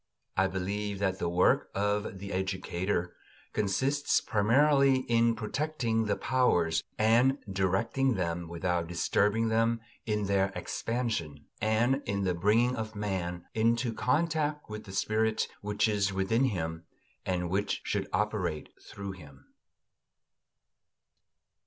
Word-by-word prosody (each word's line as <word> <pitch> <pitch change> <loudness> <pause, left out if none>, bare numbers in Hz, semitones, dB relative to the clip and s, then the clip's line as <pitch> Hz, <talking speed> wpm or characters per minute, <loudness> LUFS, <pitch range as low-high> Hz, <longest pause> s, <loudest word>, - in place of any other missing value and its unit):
I 95 0 +3
believe 100 +2 -3
that 95 -1 -1
the 85 - -1
work 90 +2 +3
of 105 0 -1
the 100 0 -6
educator 95 -1 -2 0.4
consists 130 +8 +1
primarily 135 +5 +3
in 115 -1 +2
protecting 115 -1 -1
the 105 -1 +1
powers 90 -11 +2
and 120 +5 +4
directing 100 +7 +1
them 85 -2 -2
without 85 0 -1
disturbing 105 +6 +1
them 115 +1 +2 0.3
in 105 -1 0
their 95 -1 +1
expansion; 110 -12 -3 0.2
and 115 +6 +2
in 100 0 -1
the 90 -1 +1
bringing 110 +8 +2
of 110 -2 -5
man 90 -4 -3
into 115 +1 +1
contact 150 +1 0
with 105 0 -6
the 95 - -9
spirit 110 +3 +1
which 105 +1 +1
is 100 -2 +1
within 95 +7 +1
him 80 -7 -2 0.4
and 90 -2 -2
which 100 +2 0
should - - -2
operate 75 -1 -1
through 100 -1 -7
him. 75 -7 -14
105 Hz, 120 wpm, -30 LUFS, 95-115 Hz, 0.4 s, and